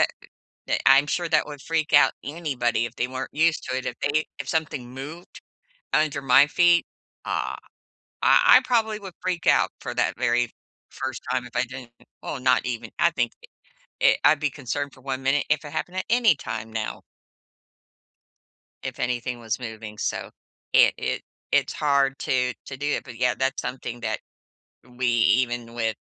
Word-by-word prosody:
uh -, -, +7 dB, 0.6 s
that -, -, 0 dB
I'm 135 Hz, +2 st, +7 dB
sure 175 Hz, +3 st, -1 dB
that 160 Hz, -, +3 dB
would 145 Hz, -2 st, -9 dB
freak 160 Hz, -1 st, -1 dB
out 145 Hz, -, +7 dB
anybody 135 Hz, -7 st, -1 dB
if 115 Hz, 0 st, -6 dB
they 125 Hz, -, -1 dB
weren't 130 Hz, +1 st, -5 dB
used 160 Hz, +1 st, +2 dB
to 130 Hz, -, -2 dB
it, 130 Hz, -, -6 dB
if -, -, -2 dB
they 145 Hz, +2 st, +1 dB
if -, -, -5 dB
something 145 Hz, -6 st, -2 dB
moved 145 Hz, +7 st, -9 dB, 0.5 s
under 145 Hz, -2 st, +1 dB
my 135 Hz, +2 st, +6 dB
feet, 170 Hz, +3 st, +4 dB, 0.4 s
uh, -, -, -2 dB, 0.7 s
I -, -, +7 dB
I -, -, +2 dB
probably 220 Hz, -3 st, +1 dB
would 195 Hz, -3 st, -9 dB
freak 180 Hz, -3 st, -2 dB
out -, -, +4 dB
for -, -, -5 dB
that -, -, +1 dB
very 120 Hz, -1 st, +1 dB, 0.4 s
first 130 Hz, -1 st, -5 dB
time 125 Hz, -1 st, 0 dB
if -, -, -13 dB
I -, -, +2 dB
didn't 125 Hz, -1 st, -10 dB, 0.3 s
Well, 140 Hz, -, -4 dB
not 125 Hz, 0 st, +3 dB
even. 120 Hz, -2 st, -4 dB
I 170 Hz, 0 st, +4 dB
think, 120 Hz, -5 st, 0 dB, 0.7 s
eh, -, -, +6 dB
I'd 145 Hz, +1 st, +5 dB
be 150 Hz, -1 st, +1 dB
concerned 140 Hz, +1 st, -4 dB
for 130 Hz, -, -17 dB
1 135 Hz, 0 st, -4 dB
minute 135 Hz, +2 st, +1 dB
if 155 Hz, 0 st, +2 dB
it 150 Hz, -, -8 dB
happened 180 Hz, +4 st, -4 dB
at -, -, -1 dB
any 230 Hz, -8 st, +5 dB
time 110 Hz, -3 st, -6 dB
now 110 Hz, -1 st, -3 dB, 1.8 s
if -, -, -5 dB
anything 125 Hz, 0 st, -2 dB
was 115 Hz, 0 st, -3 dB
moving, 110 Hz, -3 st, -7 dB
so, -, -, -3 dB, 0.4 s
it -, -, +6 dB
it -, -, -2 dB, 0.3 s
it's -, -, +2 dB
hard 140 Hz, -2 st, +2 dB
to 125 Hz, -1 st, 0 dB
to 135 Hz, -, -7 dB
do 140 Hz, -, -4 dB
it. 145 Hz, -, 0 dB
But, 125 Hz, -4 st, -11 dB
yeah, 125 Hz, -1 st, +2 dB
that's 135 Hz, +1 st, -1 dB
something 120 Hz, -2 st, -5 dB
that 110 Hz, -2 st, -2 dB, 0.7 s
we 125 Hz, 0 st, -4 dB
even 120 Hz, 0 st, +2 dB
with, 110 Hz, -2 st, -1 dB
130 Hz, 180 wpm, -25 LUFS, 120-150 Hz, 1.8 s, uh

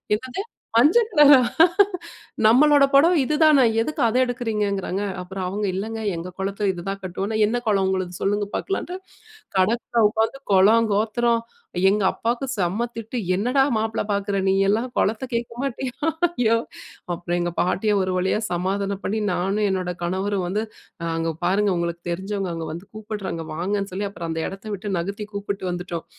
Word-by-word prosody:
"என்னது 260 Hz, -, -5 dB, 0.4 s
மஞ்ச 295 Hz, -, +6 dB
கலரா? 295 Hz, -, +7 dB, 1.1 s
நம்மளோட 285 Hz, +6 st, +6 dB
புடவ 310 Hz, +6 st, +6 dB
இதுதான! 300 Hz, 0 st, +4 dB, 0.2 s
எதுக்கு 305 Hz, +5 st, -3 dB
அத 230 Hz, +2 st, 0 dB
எடுக்கறீங்க?" 230 Hz, -4 st, -1 dB
ங்கிறாங்க 195 Hz, 0 st, -3 dB, 0.2 s
அப்புறம் 185 Hz, +1 st, -5 dB
அவங்க 205 Hz, +3 st, -2 dB
"இல்லேங்க 220 Hz, +4 st, -4 dB, 0.2 s
எங்க 170 Hz, +2 st, -5 dB
குலத்தில 200 Hz, +1 st, -1 dB
இதுதான் 195 Hz, +3 st, -5 dB
கட்டுவோம்" 190 Hz, +2 st, -3 dB
னா -, -, 0 dB
"என்ன 235 Hz, +3 st, 0 dB
குலம் 200 Hz, -3 st, +2 dB
உங்களது? 185 Hz, -2 st, -1 dB
சொல்லுங்க 205 Hz, +1 st, +1 dB
பார்க்கலான்டு, 370 Hz, -2 st, -3 dB, 0.6 s
கடைக்குள்ள 230 Hz, +4 st, +2 dB
உட்காந்து 225 Hz, +5 st, -1 dB
குலம், 215 Hz, +4 st, +5 dB
கோத்திரம், 230 Hz, +3 st, +1 dB, 0.5 s
எங்க 205 Hz, +1 st, +1 dB
அப்பாக்கு 235 Hz, +3 st, -2 dB
செம்ம 195 Hz, +6 st, 0 dB
திட்டு. 230 Hz, +2 st, -5 dB, 0.2 s
"என்னடா! 250 Hz, +8 st, +2 dB
மாப்பிள 220 Hz, 0 st, -1 dB
பாக்குற 200 Hz, 0 st, -1 dB
நீயெல்லாம் 195 Hz, +5 st, +2 dB
குலத்த 220 Hz, +5 st, 0 dB
கேட்க 235 Hz, 0 st, -3 dB
மாட்டியா?"யோவ் 265 Hz, -2 st, 0 dB, 0.5 s
அப்புறம் 175 Hz, 0 st, -3 dB
எங்க 175 Hz, 0 st, -2 dB
பாட்டிய 195 Hz, +4 st, +1 dB
ஒரு 185 Hz, 0 st, -1 dB
வழியா 190 Hz, +3 st, +1 dB
சமாதானம் 195 Hz, +2 st, -2 dB
பண்ணி 215 Hz, +2 st, -1 dB
நானும் 195 Hz, +4 st, 0 dB
என்னோட 185 Hz, -2 st, -2 dB
கணவரும் 190 Hz, +2 st, -1 dB
வந்து 205 Hz, +5 st, -1 dB, 0.5 s
அங்க 165 Hz, 0 st, -1 dB
பாருங்க 200 Hz, +3 st, +2 dB
உங்கள 170 Hz, 0 st, -1 dB, 0.2 s
தெரிஞ்சவங்க 190 Hz, +1 st, -3 dB
அங்க 165 Hz, -1 st, -5 dB
வந்து 175 Hz, +4 st, -9 dB
கூப்பிட்றாங்க, 210 Hz, -6 st, -5 dB
வாங்கன்னு 195 Hz, +4 st, -2 dB
சொல்லி 200 Hz, +2 st, -2 dB
அப்புறம் 170 Hz, -4 st, -6 dB
அந்த 160 Hz, 0 st, -2 dB
இடத்த 195 Hz, +2 st, -10 dB
விட்டு 200 Hz, 0 st, -4 dB
நகர்த்தி 200 Hz, +4 st, -4 dB
கூப்பிட்டு 200 Hz, -1 st, -4 dB
வந்துட்டோம். 175 Hz, -2 st, -5 dB
205 Hz, 150 wpm, -23 LUFS, 190-235 Hz, 1.1 s, கலரா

